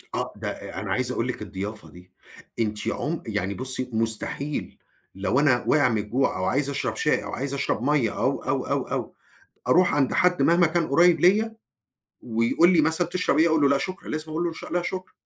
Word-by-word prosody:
آه، - - -2
ده - - -6
أ - - -7
أنا 100 0 -5
عايز 125 +4 0
أقول 120 -1 -1
لِك 130 - -4
الضيافه 105 +2 -6
دي، 90 +1 -16 0.5
أنتِ 105 -2 -2
عم - - -2
يعني 95 +3 -2
بُصّي 130 +2 -4
مستحيل، 115 +6 -3 0.4
لو 100 +7 0
أنا 130 -4 +3
واقع 145 -4 +4
من 115 - 0
الجوع 110 +6 0
أو 95 - -2
عايز 140 +7 0
أشرب 140 - -2
شاي - - +1
أو - - -6
عايز 135 +2 -3
أشرب 135 -4 -1
مَيّة 140 -5 +1
أو، - - 0
أو، - - -1
أو، - - 0
أو - - -4 0.5
أروح 180 +1 +4
عند 140 -3 +2
حد 180 0 +3
مهما 170 0 +4
كان 165 0 0
قريب 170 +4 +4
ليّا، 215 +5 +3 0.7
ويقول 115 +9 +2
لي 165 - +5
مثلًا: 160 +3 +1
"تَشرب 185 -3 0
إيه؟" 165 - +5
أقول 160 -2 +2
له: 140 - +5
"لأ، 140 - +3
شكرًا." 185 +7 -5
لازم 155 0 -4
أقول 160 +2 -1
له: 170 -2 -5
"لا 175 - +1
شكرًا." 185 +1 -5
140 Hz, 205 wpm, -25 LUFS, 115-170 Hz, 0.7 s, لي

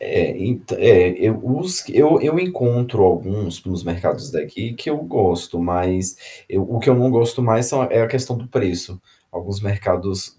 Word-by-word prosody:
É, 465 -2 -1
ent - - -4
é, 450 0 +6
eu 110 0 +1
os 175 +9 0
eu 155 +2 +5
eu 155 +4 +1
encontro 125 -9 0
alguns 95 -2 -1
nos 90 -2 -6
mercados 85 +1 -3
daqui 115 +4 -6
que 155 - -7
eu 150 - -2
gosto. 85 - -1
Mas 90 +2 -3
eu 95 - -1
o 115 +4 -4
que 115 - +2
eu - - +7
não 125 +1 +3
gosto 115 +1 +1
mais 115 +1 +2
são 130 +2 +2
é 115 - +2
a 115 - 0
questão 130 0 -2
do 120 +1 -10
preço. 90 -4 -3 0.3
Alguns 100 0 -7
mercados, 100 -2 -3
115 Hz, 180 wpm, -19 LUFS, 95-130 Hz, 0.3 s, eu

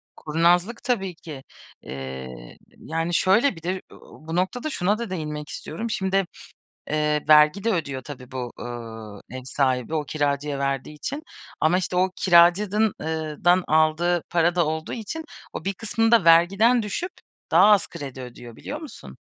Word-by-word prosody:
Kurnazlık 175 +8 +1
tabii 195 -8 -1
ki. 155 -5 -10 0.4
Eee, 65 -2 -8 0.2
yani, 165 +2 -3
şöyle, 200 +8 +3
bir 165 - -13
de 185 +2 -2
ö - - -13
bu 160 +2 -9
noktada 190 - -1
şuna 205 -5 0
da 235 -2 -5
değinmek 150 -4 -5
istiyorum. 220 +10 -5
Şimdi, 195 -2 0 0.6
eee, 150 0 +1
vergi 150 +5 +6
de 230 - +2
ödüyor 140 -7 -3
tabii 130 -1 -10
bu, 125 -2 -5
eee, 115 -1 -8
ev - - -7
sahibi, 130 0 0
o 155 - 0
kiracıya 145 -1 -1
verdiği 140 +2 -2
için. 285 - -5 0.4
Ama, 160 +3 +3
işte, 185 -1 -3
o 185 +1 +3
kiracı 190 +4 +4
eee 160 -1 -3
dan 175 +1 +5
aldığı 160 +2 +2
para 175 0 +2
da 175 -2 +3
olduğu 160 +1 -3
için, 240 +9 -5 0.3
o - - -6
bir 195 - 0
kısmını 225 +3 0
da 230 -7 +5
vergiden 195 +9 +5
düşüp 350 - -3 0.4
daha - - +7
az 205 -3 +4
kredi 140 -5 -8
ödüyor, 120 -2 -10
biliyor 295 - -7
musun? 310 - -11
165 Hz, 160 wpm, -24 LUFS, 145-195 Hz, 0.6 s, daha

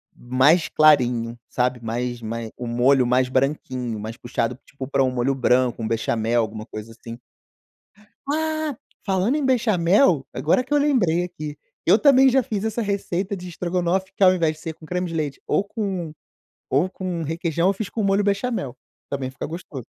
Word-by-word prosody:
mais 130 +7 +3
clarinho, 125 -6 +3
sabe, 125 0 0
mais 120 +2 -3
mais 115 0 -5
o 125 - -5
molho 125 +3 +3
mais 125 +1 +2
branquinho, 130 -4 -1
mais 110 +2 -6
puxado 120 0 -2
tipo, 135 -1 -8
pra 140 0 +2
um 130 - +1
molho 125 +2 0
branco, 125 -2 +2
um - - -1
bechamel, 115 +1 0
alguma 110 -1 -5
coisa 110 0 -8
assim. 115 +1 -10 1.1
Ah, 310 0 -1 0.3
falando 195 +6 +1
em 300 -2 0
bechamel, 200 - +3
agora 150 - +2
que 260 - -4
eu - - +5
lembrei 225 - +2
aqui, 155 -4 -7 0.3
eu 185 - +6
também 270 -2 +6
já 260 0 +3
fiz 210 -3 -3
essa 220 +1 -1
receita 200 -1 -2
de 180 0 -8
estrogonofe 180 +2 -1
que, - - +1
ao 185 -1 +7
invés 165 -4 +1
de 155 - -17
ser 165 -2 -5
com 160 - -15
creme 180 +2 -2
de 165 - -7
leite 150 -4 -3
ou - - +2
com 195 -6 -4 0.6
ou 145 +8 +2
com 185 -3 -4
requeijão, 165 +2 0
eu - - +4
fiz 200 0 -5
com 220 +2 -3
molho 195 0 +2
bechamel, 200 - -1 0.3
também 135 -2 -3
fica 130 - -6
gostoso. 155 -6 -8
160 Hz, 180 wpm, -23 LUFS, 125-195 Hz, 1.1 s, ao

